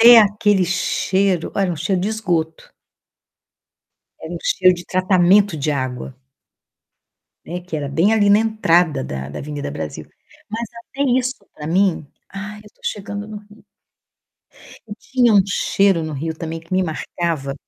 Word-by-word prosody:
Até 235 +1 +10
aquele 205 -2 +3
cheiro 190 0 0
olha, 195 -2 +1
um - - -5
cheiro 180 +5 0
de 195 - -1
esgoto. 175 -7 -2 1.5
Era - - -7
um - - -4
cheiro - - +4
de 175 - -9
tratamento 185 0 +3
de 150 +1 -1
água. 130 -1 -4 1.3
Né, 175 +1 -5
que 175 -2 -6
era 145 -2 -3
bem 165 +10 +2
ali 205 -2 +4
na 205 - +7
entrada 180 - +2
da 70 +1 -5
da 70 - -7
Avenida 145 0 -5
Brasil. 80 -1 -6 0.4
Mas 230 +2 -3 0.2
até 280 - -3
isso 255 +1 +1 0.2
pra 150 - -8
mim, 180 -2 +1 0.2
"Ah, 210 +2 -7
eu 210 0 -15
tô - - -34
chegando 205 +1 -4
no 215 - -7
Rio". 210 +2 -18 1.2
E 205 - -7
tinha 245 -3 +2
um 200 - +7
cheiro 195 -2 +2
no 155 - -4
Rio 160 +3 -3
também 165 0 -5
que 165 +3 -15
me 185 - +3
marcava. 160 -4 -3
185 Hz, 160 wpm, -20 LUFS, 160-210 Hz, 1.5 s, Até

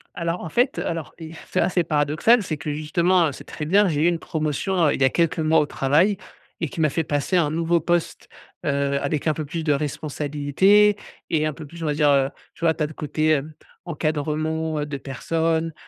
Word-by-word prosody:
Alors 170 +1 -2
en 160 - -6
fait, 250 - +1
heu, - - -2
alors, 165 -2 -4
if 160 0 -9
c'est - - +1
assez 180 0 +2
paradoxal, 155 +9 +2
c'est 155 -4 -3
que 145 +1 -4
justement, 170 +4 +2
heu - - -5
c'est - - -11
très 150 - -6
bien, 200 +5 +4
j'ai 150 -1 0
eu - - +4
une 170 -1 +1
promotion, 155 +5 -2
heu, - - +1
il - - -4
y 135 - +6
a - - +4
quelques 170 -1 0
mois 160 0 +3
au 150 - +2
travail. 155 +9 +2 0.4
Et 165 - -1
qui 165 - -8
m'a 155 - +3
fait 160 +4 -1
passer 145 +5 -1
un 155 -4 +2
nouveau 165 +1 +1
poste, 175 0 -1 0.4
heu, 140 0 0
avec 145 +2 -2
un 155 - +3
peu 155 - -4
plus 160 +3 -5
de 150 - +3
responsabilités 150 +7 +2 0.3
et 155 -2 +1
un 155 - 0
peu 155 +1 -10
plus 165 +3 -12
on 155 - -1
va 150 - +1
dire, 150 -1 +3
heu, 135 -1 +3 0.2
tu - - -13
vois? 165 -1 +4
Tu 155 - -1
as - - +2
le 155 - -8
côté, 155 +2 -1
hem, 155 +1 0 0.3
encadrement, 155 0 -2
heu, 145 - -1
de 145 - -5
personnes, 160 +4 -1
155 Hz, 235 wpm, -23 LUFS, 145-170 Hz, 0.4 s, y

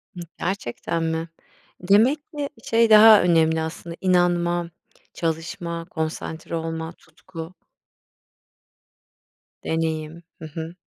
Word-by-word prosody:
Hıı, 175 - -6 0.2
gerçekten 170 -2 -3
mi? 160 0 -2 0.5
Demek 220 +11 +4
ki, 290 -2 -4
şey, 230 0 +3
daha 215 0 +9
önemli 160 -2 +3
aslında, 165 +1 -6
inanma, 175 -2 +2 0.4
çalışma, 165 +1 -4
konsantre 160 0 -4
olma, 165 0 -4
tutku 165 +1 -11 2.1
deneyim. 160 0 -3 0.2
Hı 160 - -8
hı. 160 +2 -7
170 Hz, 95 wpm, -23 LUFS, 160-180 Hz, 2.1 s, daha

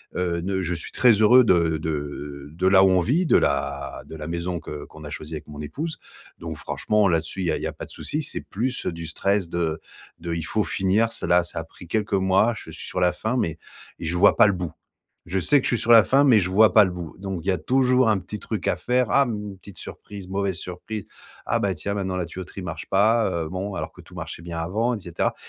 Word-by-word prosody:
heu, 90 -1 -1
ne 95 +2 -1
je 90 -1 -1
suis 80 - -4
très 125 -2 +5
heureux 110 +4 +6
de 85 -7 +3
de 75 -2 -5
de 90 +3 0
là 95 0 +6
où - - +5
on 90 -1 +4
vit, 150 - +1
de - - +3
la 70 0 -1
de - - -9
la 75 -1 -7
maison 85 +1 -3
que 75 -1 -7
qu'on 80 - -13
a 75 - -7
choisi 75 +1 -7
avec 75 - -8
mon 75 -1 -10
épouse, 155 - -5 0.4
donc 80 -1 -6
franchement, 105 +7 +1
là 85 -1 +3
dessus, 80 +4 -6
il 90 - -1
y - - +2
a - - 0
il - - -8
y - - 0
a - - -5
pas - - -8
de - - -17
souci. 155 - -3
C'est 150 - -2
plus, 125 +5 -3
heu, - - 0
du 85 0 -7
stress 100 +3 0
de 85 -2 -1 0.4
de 85 0 -4
il 85 - -3
faut 110 +5 0
finir, 100 +5 +1
c'est - - -1
là 90 0 +4
ça 85 - -4
a - - -4
pris 85 +2 -14
quelques 105 +2 -1
mois, 95 +4 +3
je - - -10
suis - - -8
sur - - -2
la 90 0 +4
fin, 110 +4 -2
mais 80 -10 -1 0.4
et - - -6
je 80 +2 -1
vois 90 - +5
pas 115 - +8
le 105 - +2
bout. 90 -3 -4 0.6
Je 95 +3 -1
sais 140 - +4
que - - -10
je 120 - +2
suis - - -3
sur 120 - +3
la 115 -1 +10
fin, 135 +9 +4
mais 125 -6 +6
je 90 - -1
vois 105 +1 +5
pas 110 - +8
le 95 - -1
bout, 90 -3 -7
donc 95 -3 -5
il - - -5
y - - +4
a 90 - -1
toujours 130 +2 +3
un 105 -2 +3
petit 100 +3 -7
truc 110 - -4
à - - +1
faire. 125 +6 +1
Ah 140 - +5
m 115 - -2
une 95 - -11
petite 100 0 -13
surprise, 100 -3 -9
mauvaise 95 -1 -1
surprise. 90 +5 -6 0.4
Ah - - +1
bah 100 -2 0
tiens, 100 +4 -4
maintenant, 95 -2 -2
la 90 - -1
tuyauterie 95 +3 -8
marche 80 -3 -6
pas, 110 +3 +3 0.2
heu, - - -6
bon, 95 +2 -4
alors - - -4
que - - -14
tout - - -17
marchait - - -7
bien 85 -1 -6
avant, 110 +9 0
et - - -4
cetera, 85 -2 -2
95 Hz, 275 wpm, -24 LUFS, 85-110 Hz, 0.6 s, la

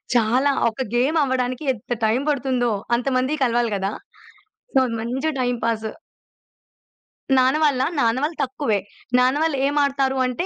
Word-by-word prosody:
చాలా 245 +5 +3 0.2
ఒక 225 +3 -7
గేమ్ 270 +7 +2
అవ్వడానికి 255 0 -1
ఎంత 240 +1 -5
టైం 220 +3 +2
పడుతుందో 255 -4 0 0.3
అంతమంది 255 +2 0
కలవాలి 240 -2 +1
కదా! 195 0 -2 0.8
సో - - +7 0.2
మంచి 255 +7 -2
టైమ్ 245 -1 0
పాాస్. 225 -1 -1 1.5
నాన్న 260 +2 +4
వాళ్ళా? 270 -4 +2
నాన్న 230 -1 +2
వాళ్ళు 315 +2 -2
తక్కువే. 255 -5 -1 0.4
నాన్నవాళ్ళు 280 +4 +2
ఏం 285 - -2
ఆడతారు 270 -1 0
అంటే 250 +7 -2
255 Hz, 130 wpm, -22 LUFS, 240-275 Hz, 1.5 s, సో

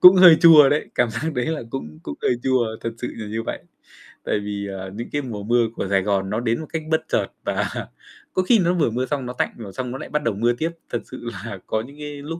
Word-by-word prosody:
cũng 180 +1 +10
hơi 180 -3 +9
chua 155 -4 +9
đấy, 150 - 0
cảm 120 -1 +2
giác 150 +8 -3
đấy 125 -1 0
là 160 -5 -2
cũng 75 -12 -6
cũng 70 - -6
hơi - - +3
chua, 120 -4 +1
thật 115 - -3
sự 125 - -3
là 110 - -6
như 110 +2 -3
vậy. - - -4 0.7
Tại - - 0
vì, 100 -1 -4
à, 95 0 -6
những 115 - -5
cái 145 - 0
mùa 110 -6 -6
mưa 120 +2 +3
của - - -2
Sài 95 -1 +3
Gòn 95 -1 0
nó 105 - -1
đến 115 -1 0
một 155 - -8
cách 160 - -1
bất 160 - +3
chợt - - +1 0.2
và - - 0 0.6
có - - +2
khi 225 +4 +5
nó 175 -1 +3
vừa 165 -8 +2
mưa 125 +3 -1
xong 135 -1 -2
nó 125 - -5
tạnh - - -1
rồi 105 -5 -8
xong 125 +1 -4
nó 130 - -4
lại - - -8
bắt 150 0 -1
đầu 115 -4 0
mưa 120 +3 +2
tiếp. 160 +7 -2 0.2
Thật - - -1
sự - - -6 0.2
là - - -6
có 110 - 0
những 140 +5 -11
cái 145 -1 -6
lúc 165 +3 -5
125 Hz, 275 wpm, -23 LUFS, 110-150 Hz, 0.7 s, cũng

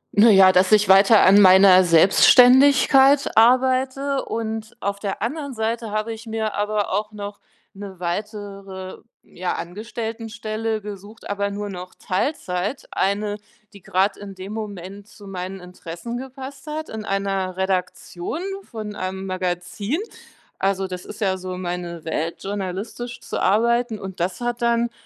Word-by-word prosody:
Na 220 +3 +7
ja, 190 -2 +7
dass 185 +2 +3
ich 210 -2 +4
weiter 195 +3 +7
an 200 +2 +7
meiner 185 0 +7
Selbstständigkeit 265 - +6
arbeite 260 +3 +3
und 220 0 -5
auf 200 0 -3
der 200 0 -4
anderen 280 +1 -4
Seite 225 0 -2
habe 215 +2 -2
ich 225 +1 -11
mir 220 -1 -2
aber 205 -1 -1
auch 210 +2 -1
noch 205 0 -7 0.3
'ne 195 -2 -10
weitere, 195 0 -6 0.3
ja, 180 0 -4
Angestelltenstelle 225 +2 -5
gesucht, 205 +2 -10
aber 200 0 -2
nur 205 0 -5
noch 180 -1 -8
Teilzeit, 190 - -3
eine, 205 +1 -1 0.4
die 200 - -14
grad 190 +3 +1
in 200 -1 -10
dem 190 +3 -8
Moment 200 -2 -7
zu 205 -2 -15
meinen 190 0 -6
Interessen 180 +5 -8
gepasst 265 +3 -9
hat 310 +1 -5
in 220 -1 -6
einer 195 -2 -2
Redaktion 190 - -3 0.3
von 215 -3 -6
einem 190 +1 -4
Magazin. 185 - -3 0.6
Also, 195 0 0
das 180 -1 -7
ist - - -10
ja 190 -2 +1
so 185 0 -6
meine 175 -2 -5
Welt, 160 +1 -3
journalistisch 200 +5 -5
zu - - -4
arbeiten 235 +2 +2
und 190 -2 -8
das 185 +7 -2
hat 240 0 -3
dann 235 0 +1
205 Hz, 145 wpm, -22 LUFS, 190-230 Hz, 0.6 s, Na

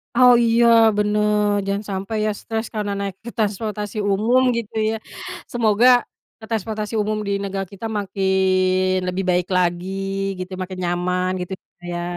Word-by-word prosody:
Oh, 250 0 +7
iya, 230 +1 +4 0.3
bener. 210 -1 +2
Jangan 200 +1 -2
sampai 195 +3 -3
ya - - +1
stres 225 0 -3
karena 210 -1 -2
naik 200 -1 -3 0.2
transportasi 210 0 -2
umum 225 +6 +3 0.2
gitu 230 -1 -5 0.2
ya. - - -2 0.6
Semoga, 230 0 +3 0.6
transportasi 215 0 -3
umum 215 +1 -1
di - - -1
negara 195 0 -3
kita 225 +3 -5
makin 185 -1 +1
lebih 180 +1 -1
baik 180 0 +2
lagi 175 0 0 0.5
gitu, 185 +1 -6
makin 185 0 -6
nyaman 180 +1 0
gitulah 180 +1 -8
ya. 175 - -3
200 Hz, 140 wpm, -21 LUFS, 185-215 Hz, 0.6 s, Oh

